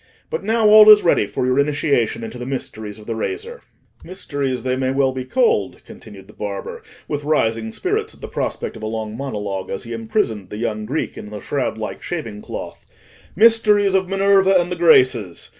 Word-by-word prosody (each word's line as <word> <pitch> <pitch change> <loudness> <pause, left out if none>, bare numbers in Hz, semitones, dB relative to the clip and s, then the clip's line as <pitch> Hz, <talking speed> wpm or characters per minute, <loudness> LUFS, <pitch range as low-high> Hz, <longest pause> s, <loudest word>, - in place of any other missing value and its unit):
But 475 - -3
now 225 -1 +2
all 215 0 +9
is 210 -1 +9
ready 135 - +3
for 125 - -2
your 130 +2 +2
initiation 140 -6 0
into 115 +2 -7
the 125 - -5
mysteries 110 -5 -6
of 105 - -13
the 115 - -3
razor." 430 - -5 0.4
"Mysteries 145 -8 -3
they 130 0 0
may 130 0 -1
well 135 0 +1
be 130 -1 -5
called," 460 - 0
continued - - -13
the - - -17
barber, 475 -1 -6 0.3
with 145 -1 -3
rising 115 -7 0
spirits - - -2
at - - -21
the - - -6
prospect - - -4
of 110 - -10
a 110 - -4
long 110 -1 -4
monologue, 105 -7 -4
as 95 - -4
he 115 - -7
imprisoned 110 - -2
the 105 - -7
young 110 -2 -3
Greek 150 +6 -3
in 105 - -9
the 105 0 -7
shroud 125 -2 -2
like 110 -1 -6
shaving 115 -12 -5
cloth; - - -8 0.5
"mysteries 210 -2 +4
of 190 -1 +1
Minerva 195 0 +3
and 175 +1 -2
the - - -1
Graces. 130 - +3
135 Hz, 195 wpm, -20 LUFS, -, 0.5 s, all